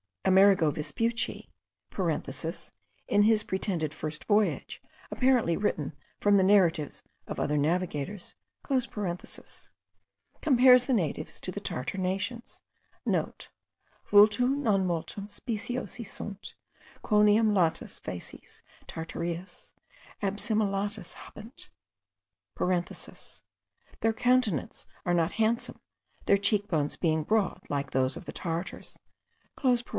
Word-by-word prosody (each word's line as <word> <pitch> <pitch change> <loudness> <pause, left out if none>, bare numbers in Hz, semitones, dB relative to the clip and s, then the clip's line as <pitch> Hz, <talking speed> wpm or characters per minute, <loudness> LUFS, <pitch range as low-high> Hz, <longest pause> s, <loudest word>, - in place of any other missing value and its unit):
Amerigo 190 -4 +5
Vespucci 230 +10 -1 1.6
(in 205 - +3
his 215 0 +4
pretended 185 -6 -1
FIRST 155 -1 -5
voyage, 210 0 +1 0.3
apparently 250 -10 +3
written 160 -8 -1 0.3
from 205 -1 +4
the 190 - +4
narratives 180 -6 +3 0.2
of - - -5
other 150 +1 0
navigators) 175 +3 -1 0.3
compares 210 -9 -3 1.3
the 265 - +1
natives 170 - -1
to - - -3
the - - -5
Tartar 130 +10 -4
nations,* 195 +6 -3 0.3
(* - - -37
Vultu - - -2 1.1
non 210 -9 +2
multum 180 +3 -3
speciosi 235 +2 -4
sunt, 200 0 -7 0.5
quoniam 210 +1 +4
latas 175 -5 0
facies 90 - -9 0.2
Tartariis 170 +2 -6 0.5
adsimilatas 205 -1 0
habent. 225 +5 -11 2.3
(Their 225 0 +2
countenances 245 - +1 0.2
are 175 - +1
not 170 -1 +1
handsome, 225 +1 0 0.4
their 200 - +5
cheek 205 0 +1
bones 150 -5 0
being 160 -2 +1
broad 210 +2 +1
like 140 -1 -2
those 130 0 +1
of - - -8
the - - -6
Tartars.) 170 +1 -4
195 Hz, 100 wpm, -29 LUFS, 165-215 Hz, 2.3 s, Amerigo